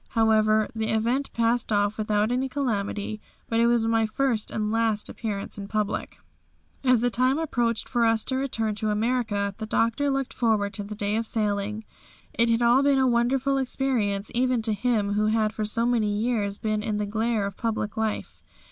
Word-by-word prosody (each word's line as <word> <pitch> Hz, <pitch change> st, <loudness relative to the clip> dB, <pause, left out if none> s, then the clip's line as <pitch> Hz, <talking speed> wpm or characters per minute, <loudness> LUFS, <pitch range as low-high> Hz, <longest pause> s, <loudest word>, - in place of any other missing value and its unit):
However, 215 Hz, -1 st, +4 dB
the 220 Hz, -1 st, -2 dB
event 235 Hz, +6 st, 0 dB
passed 230 Hz, 0 st, 0 dB
off 205 Hz, +1 st, +1 dB
without 210 Hz, +1 st, +1 dB
any 260 Hz, +2 st, 0 dB
calamity 215 Hz, -5 st, -2 dB, 0.3 s
but 225 Hz, -, 0 dB
it 235 Hz, -, +4 dB
was 235 Hz, -1 st, +2 dB
my 225 Hz, -1 st, +2 dB
first 235 Hz, -1 st, -1 dB
and 215 Hz, -1 st, -2 dB
last 225 Hz, -2 st, 0 dB
appearance 210 Hz, -2 st, -5 dB
in 200 Hz, -, -6 dB
public. 210 Hz, 0 st, -2 dB, 0.7 s
As 255 Hz, -3 st, +4 dB
the 245 Hz, 0 st, +1 dB
time 255 Hz, +4 st, +2 dB
approached 240 Hz, -8 st, -1 dB
for 240 Hz, -2 st, +1 dB
us 225 Hz, -1 st, +2 dB
to 260 Hz, -, -2 dB
return 230 Hz, -5 st, -1 dB
to 215 Hz, 0 st, -1 dB
America 210 Hz, -2 st, 0 dB
the 220 Hz, -, -4 dB
Doctor 230 Hz, +6 st, +1 dB
looked 270 Hz, -1 st, -1 dB
forward 215 Hz, -3 st, +1 dB
to 205 Hz, -, -4 dB
the 210 Hz, +1 st, -7 dB
day 205 Hz, +1 st, 0 dB
of 225 Hz, 0 st, -2 dB
sailing. 210 Hz, 0 st, -2 dB, 0.5 s
It 235 Hz, 0 st, +3 dB
had 230 Hz, +1 st, +2 dB
all 240 Hz, +3 st, +5 dB
been 280 Hz, -1 st, +3 dB
a 265 Hz, -, +3 dB
wonderful 260 Hz, +3 st, +2 dB
experience 240 Hz, -7 st, -1 dB
even 250 Hz, -1 st, +1 dB
to 220 Hz, -1 st, 0 dB
him 210 Hz, -2 st, 0 dB
who 210 Hz, +1 st, +1 dB
had 215 Hz, 0 st, +1 dB
for 215 Hz, -1 st, -2 dB
so 230 Hz, +2 st, -1 dB
many 230 Hz, -4 st, +1 dB
years 205 Hz, -2 st, -1 dB
been 215 Hz, -1 st, -1 dB
in 215 Hz, -1 st, -2 dB
the 210 Hz, -, -1 dB
glare 220 Hz, 0 st, 0 dB
of 200 Hz, -1 st, -5 dB
public 220 Hz, -2 st, -2 dB
life. 220 Hz, -2 st, -3 dB
225 Hz, 190 wpm, -25 LUFS, 210-240 Hz, 0.7 s, all